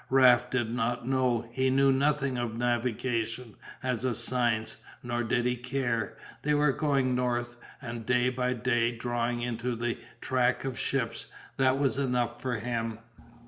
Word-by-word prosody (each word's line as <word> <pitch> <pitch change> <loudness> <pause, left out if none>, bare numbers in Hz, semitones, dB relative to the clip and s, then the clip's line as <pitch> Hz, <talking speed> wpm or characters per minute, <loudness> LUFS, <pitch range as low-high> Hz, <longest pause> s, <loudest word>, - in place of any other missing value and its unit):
Raft 125 -2 +6
did 120 -3 0
not 120 0 -1
know, 125 -3 +1
he 130 +2 +1
knew 135 +1 +4
nothing 140 0 +1
of 120 -2 -2
navigation 120 -1 -1 0.3
as 125 -2 -1
a 125 -3 +1
science, 115 -2 0 0.3
nor 120 -1 -1
did 120 +1 0
he 125 0 +2
care, 125 -3 -2 0.2
they 150 +1 +2
were 145 -1 +4
going 135 -3 +1
north 120 -1 -1 0.3
and 120 -1 -5
day 125 +2 +2
by 125 0 0
day 120 0 +1
drawing 120 0 -1
into 120 0 -2
the 120 0 -2 0.2
track 125 0 +1
of 130 -2 -3
ships, 115 -4 -1 0.3
that 130 0 +3
was 140 -1 +1
enough 125 -3 0
for 125 -2 -1
him. 115 -1 -2
125 Hz, 155 wpm, -29 LUFS, 120-130 Hz, 0.3 s, Raft